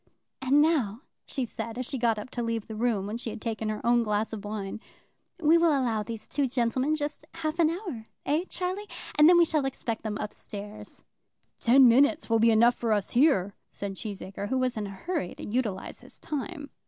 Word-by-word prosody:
"And 275 +3 +4
now," 260 -9 +1 0.3
she 265 -3 -2
said, 230 0 -6
as 255 - -2
she 265 - -4
got 230 -2 +2
up 210 +5 -7
to 240 - -3
leave 230 -2 -2
the 220 - -8
room, 220 -3 0
when 210 +3 -3
she 235 - -5
had 220 - -6
taken 220 -1 -3
her 215 - -4
own 240 0 +4
glass 215 0 -1
of 210 -2 -5
wine, 205 0 -4 0.6
"We 330 +1 +5
will 335 0 +4
allow 230 -4 0
these 225 0 -6
two 280 -2 0
gentlemen 255 +4 +1
just 295 0 -4
half 325 0 -3
an 320 -2 +5
hour, 330 - -5 0.2
eh 310 +5 +1
Charlie? 370 +3 -3 0.3
and 300 +2 +9
then 355 - +7
we 340 - +7
shall 305 -3 0
expect 250 -4 -3
them 215 -2 -3
up 210 - -4
stairs." 205 +1 -8 0.6
"Ten 255 +2 +7
minutes 280 +3 +4
will 225 - +4
be 230 +1 +5
enough 230 +2 +5
for 230 -2 0
us 205 -2 -1
here," 235 - +3 0.2
said 200 -1 -5
Cheesacre, 200 -1 -6
who 260 - +1
was 255 -1 0
in 210 -2 -3
a - - -7
hurry 195 - -4
to - - -8
utilize 210 -4 -2
his - - -12
time. 295 0 -5
235 Hz, 215 wpm, -28 LUFS, 215-290 Hz, 0.6 s, and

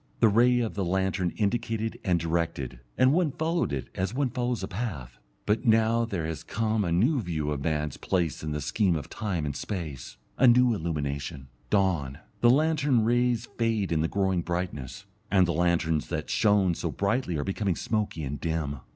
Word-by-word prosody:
The 115 - +6
ray 120 +3 +4
of 115 - -2
the 100 - -2
lantern 95 0 0
indicated 110 +1 -1
and 90 -2 +2
directed, 80 -7 -2 0.2
and 130 +2 +5
one 170 -3 +2
followed 165 +3 0
it 70 -2 -3
as 95 +5 -2
one 135 -2 0
follows 125 -1 -2
a - - -2
path. 85 - -5 0.3
But 105 +2 +1
now 115 0 +3
there 95 -8 -3
has 80 -1 -4
come 110 0 0
a 85 - -1
new 120 - +3
view 80 -6 -2
of 70 -2 -3
man's 75 -3 -1
place 90 -5 -1
in 75 - -4
the 75 0 -2
scheme 85 +5 +1
of 75 - -5
time 90 -8 -2
and 70 -1 -3
space, 80 - -5 0.2
a 130 - +6
new 125 0 +5
illumination, 70 -5 -3 0.2
dawn; 85 -10 +1 0.2
the 120 - +5
lantern 145 -4 +3
rays 120 0 +1
fade 110 -5 +1
in 80 -2 +2
the 80 - +1
growing 95 -1 0
brightness, 85 0 -4 0.2
and 95 -2 +4
the 85 - -1
lanterns 85 -2 +1
that - - -4
shone 100 -4 +3
so - - -3
brightly 100 -4 -1
are 70 - -1
becoming 95 0 -1
smoky 105 -7 -2
and 70 0 -5
dim. 80 -4 -2
95 Hz, 185 wpm, -27 LUFS, 80-115 Hz, 0.3 s, The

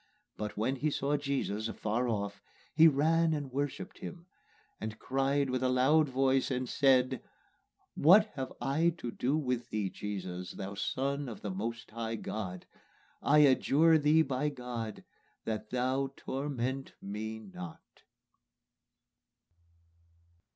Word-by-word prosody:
But 105 0 -5
when 125 +6 0
he 155 +4 +1
saw 145 0 0
Jesus 140 -7 -1
afar 115 +2 -1
off, 100 -2 -2 0.3
he 160 +1 +8
ran 160 +2 +3
and 145 -3 -4
worshipped 140 +1 -3
him, 175 -2 -8 0.5
And 110 0 -5
cried 135 +2 0
with 130 - 0
a 130 - +2
loud 140 +4 +4
voice, 135 0 +2
and 130 -1 -1
said, 130 -1 +3 0.7
What 190 +8 +7
have 130 -2 -4
I 155 +7 +1
to 120 -7 -5
do 135 +6 0
with 125 -5 -2
Thee, 105 -3 -2
Jesus, 90 -3 -5
Thou 100 +1 -6
Son 135 +6 -2
of 110 - -8
the 105 - -2
Most 115 +5 -4
High 115 0 -3
God? 95 -5 -5 0.6
I 150 +1 +5
adjure 155 +4 +5
Thee 155 +2 +5
by 135 +1 -1
God, 125 -5 -6 0.4
that 110 -1 -3
Thou 130 +2 0
torment 135 -1 -3
me 110 +2 -5
not." 95 -5 -11
130 Hz, 130 wpm, -32 LUFS, 110-140 Hz, 0.7 s, he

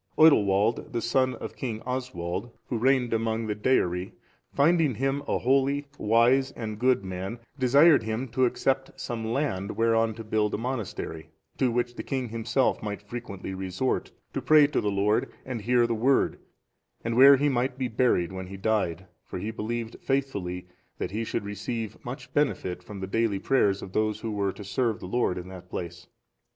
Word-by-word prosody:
Oidilwald,(425) 110 -8 +4
the 120 - -1
son 130 +1 +2
of - - -7
King 115 -4 -4
Oswald, 120 -6 -3 0.2
who 120 - -1
reigned 125 -1 +2
among 115 0 0
the 105 - -1
Deiri, 95 -5 0 0.4
finding 155 -2 +3
him 135 +4 0
a - - +1
holy, 135 +3 +2
wise, 120 +5 +4
and 110 -2 -5
good 125 -5 +2
man, 95 +4 -4 0.2
desired 140 +5 +6
him 110 +4 -3
to 130 +3 +2
accept 135 +2 -1
some 115 -2 -4
land 110 -7 -2
whereon 115 -1 +2
to 115 - -7
build 110 -1 0
a - - -2
monastery, 110 -9 -4 0.3
to 130 - +3
which 120 +1 -1
the - - -6
king 130 -3 -3
himself 115 +3 0
might 105 -1 -5
frequently 105 -4 -6
resort, 95 +7 -2 0.2
to - - -2
pray 155 -1 +6
to 145 - 0
the 105 - 0
Lord 100 +2 +1
and 125 -4 -4
hear 120 +2 +3
the 115 - 0
Word, 125 +5 +2 0.6
and 115 0 -1
where 135 +2 +9
he 145 +2 +2
might 125 -1 0
be 130 -1 -1
buried 110 -7 +1
when 95 -1 -6
he 95 +1 -8
died; 100 -5 0 0.2
for - - -7
he 105 +5 -3
believed 115 +1 -4
faithfully 100 -11 -2 0.3
that - - -3
he 110 +3 -2
should 105 - -3
receive 110 +2 -5
much 125 +1 -8
benefit 95 -11 0
from 100 +1 -9
the - - -2
daily 110 +1 0
prayers 100 -4 +2
of 95 - -9
those 110 0 0
who 115 - -3
were 100 -2 0
to 105 - -10
serve 110 +3 -1
the - - -8
Lord 95 -1 0
in 90 0 -6
that 90 -1 -11
place. 85 +1 -6
115 Hz, 185 wpm, -27 LUFS, 100-130 Hz, 0.6 s, where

